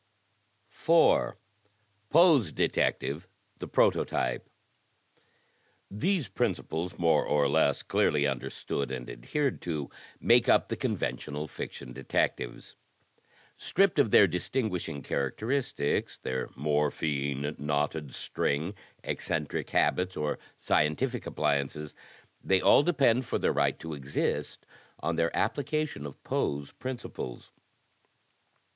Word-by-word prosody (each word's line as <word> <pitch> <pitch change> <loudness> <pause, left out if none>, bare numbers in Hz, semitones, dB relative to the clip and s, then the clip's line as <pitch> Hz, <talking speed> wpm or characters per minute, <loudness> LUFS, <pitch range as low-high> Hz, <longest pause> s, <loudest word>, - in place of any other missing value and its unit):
'' - - -41
4, - - +3 0.7
Poe^s 150 - +5
Detective 80 +6 0 0.2
— 100 - -39
The - - -5
Prototype 60 -1 +1 1.4
These 160 - 0
principles, 90 -1 -2
more 85 -1 +3
or 75 -1 +2
less 70 -1 +2
clearly 75 -1 +2
understood 70 +1 -3
and 65 -2 -5
adhered 120 - -2
to, 75 -5 -4 0.3
make - - +4
up - - +4
the - - -1
conventional 75 +1 -3
Fiction 60 -3 -7
Detectives. - - -2 0.8
Stripped 195 -5 +2
of 140 - +4
their 100 - +7
distinguishing 90 - -2
characteristics, 110 - -1
their 65 0 -3
morphine, 75 0 -1
knotted 75 0 -1
string, 80 +7 -1 0.3
eccentric 75 -2 -3
habits, 90 +1 +1
or 75 -1 -1 0.2
scientific 75 0 0
appliances, 75 0 -1 0.5
they 95 -1 +3
all - - +6
depend 140 -6 +3
for - - 0
their - - +1
right - - +1
to 80 -1 -7
exist, 70 -1 -2 0.3
on 85 - -1
their 85 0 +2
application 145 - -1
of 70 - -13
Poe's 70 0 -1
principles. 125 - -7
75 Hz, 105 wpm, -29 LUFS, 70-105 Hz, 1.4 s, their